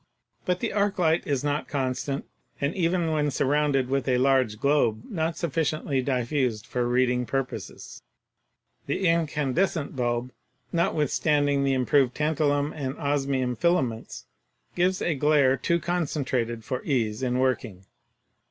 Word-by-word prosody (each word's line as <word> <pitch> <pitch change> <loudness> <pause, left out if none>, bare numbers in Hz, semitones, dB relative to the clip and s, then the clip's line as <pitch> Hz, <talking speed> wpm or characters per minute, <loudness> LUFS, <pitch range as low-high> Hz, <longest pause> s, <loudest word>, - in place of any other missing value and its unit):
But 180 0 0
the - - -2
arc 205 0 +1
light 165 -2 +2
is 140 -2 0
not 145 0 -1
constant, 135 0 -2 0.3
and 140 +3 0
even 170 -2 0
when 150 -1 +1
surrounded 140 -1 +1
with 135 +1 -1
a 125 -1 +3
large 130 -4 +2
globe 120 -6 +2
not 165 -3 -2
sufficiently 155 -4 -1
diffused 125 -3 -1
for 120 +1 -1
reading 125 0 +1
purposes; 135 +2 -5 0.9
the 190 - 0
incandescent 160 0 0
bulb, 120 0 -1 0.4
notwithstanding 150 -3 +1
the 135 -1 +2
improved 130 0 +2
tantalum 150 -1 +1
and 135 -3 -4
osmium 135 -4 0
filaments 135 -10 -1 0.5
gives 185 +1 +1
a 170 - +1
glare 145 -2 +3
too 170 +6 0
concentrated 135 -9 -2
for 130 +2 -4
ease 115 -5 -1
in 125 -1 0
working. 125 -7 -1
140 Hz, 130 wpm, -26 LUFS, 125-155 Hz, 0.9 s, a